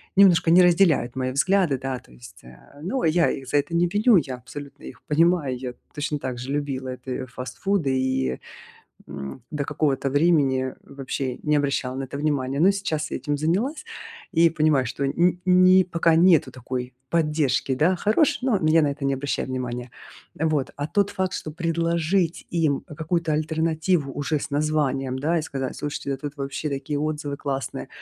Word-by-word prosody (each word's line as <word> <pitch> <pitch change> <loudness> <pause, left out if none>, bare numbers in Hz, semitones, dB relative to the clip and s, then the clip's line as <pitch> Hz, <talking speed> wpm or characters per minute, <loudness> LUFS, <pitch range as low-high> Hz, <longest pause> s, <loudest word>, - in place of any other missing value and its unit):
немножко 180 -4 +5
не 180 +2 +7
разделяют 170 -8 +3
мои 130 -1 -1
взгляды, 160 0 +2
да, 135 0 -3
то 120 - -22
есть, - - -14
э, 65 - -16
ну, 250 +9 -2
я 165 +1 +3
их 135 -1 -6
за 145 - +1
это 145 +3 -1
не 175 +1 +3
виню, 210 +4 +4
я 135 -6 -1
абсолютно 140 +3 -10
их - - -10
понимаю. 160 -4 +2
Я 125 -1 -6 0.2
точно 150 0 -2
так 130 -3 -4
же 130 +3 -5
любила 140 -3 -2
это 125 +1 -8
и 130 - -3
фастфуды 130 +4 -2
и, 65 - -1 0.7
м, 70 - -7
до 150 -2 -2
какого-то 140 -2 0
времени 140 -4 +2
вообще 135 -2 -4
не 150 0 +2
обращала 140 -3 -1
на 135 - -3
это 135 +2 -7
внимания. 140 -2 -1
Но 185 +4 +6
сейчас 155 -6 -3
я - - -2
этим 145 0 -2
занялась 205 - -1 0.5
и 170 -1 +5
понимаю, 155 -5 +2
что 130 +3 -3
н 175 +5 +1
ни 185 +1 +6
пока 170 -2 +2
нету 165 -6 +4
такой 125 0 -5 0.2
поддержки, 150 -5 +1
да, 160 +8 +2
хорошей, 280 - +2
но 250 -6 +2
я 160 +1 +5
на 150 - +2
это 140 -1 -4
не 135 - +1
обращаю 135 0 -3
внимания. 125 -1 -4 0.5
Вот. 155 -3 0
А 145 - -2
тот 200 +4 +1
факт, 190 -1 -2
что 155 - -5
предложить 170 +1 0
им 160 -5 +1
какую-то 160 +1 -2
альтернативу 160 0 0
уже 145 +2 -1
с - - -6
названием, 140 -3 0
да, 160 +5 +1
и - - -2
сказать: 135 -4 -4
"Слушайте, 145 -1 -4
да 135 - -1
тут 145 +2 -6
вообще 140 +2 -4
такие 140 +1 -3
отзывы 150 -2 -3
классные", 135 -2 -4
145 Hz, 180 wpm, -24 LUFS, 135-170 Hz, 0.7 s, не